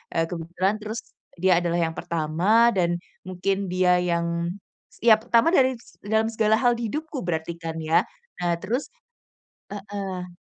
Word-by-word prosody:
Eee, 165 - +3
kebetulan 175 +4 -1
terus 215 +2 -5 0.4
dia 185 0 +4
adalah 170 0 0
yang 165 -1 0
pertama, 170 +9 +2
dan 175 -2 +1 0.2
mungkin 190 +1 -2
dia 180 0 +3
yang 170 0 -1 0.4
setiap 220 -1 +4
pertama 235 +1 +3
dari 260 -4 +3 0.2
dalam 220 +2 +1
segala 220 -1 +2
hal 245 -2 +3
di 230 -2 -3
hidupku 310 -3 -4
berarti 170 -1 -3
kan 165 -1 -6
ya. 160 +1 +3 0.4
Nah 170 -1 0
terus 235 +10 -3 0.8
heeh. 195 -3 -5
185 Hz, 145 wpm, -24 LUFS, 170-220 Hz, 0.8 s, dia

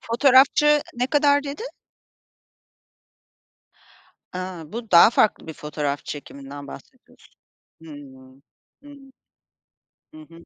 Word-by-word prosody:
Fotoğrafçı 275 +4 +3
ne 245 +1 -1
kadar 285 0 +2
dedin? 290 - -7 2.6
A, 180 -3 -8
bu 230 -1 -7
daha 170 +5 +7
farklı 215 - +1
bir 160 - -7
fotoğraf 150 -2 -5
çekiminden 140 -1 -9
bahsediyorsun. 70 - -16 0.5
Hımm. 135 -4 -14 0.4
Hımm. 280 -2 -16 1.0
Hı 315 - -13
hı. 170 - -17
185 Hz, 90 wpm, -22 LUFS, -, 2.6 s, daha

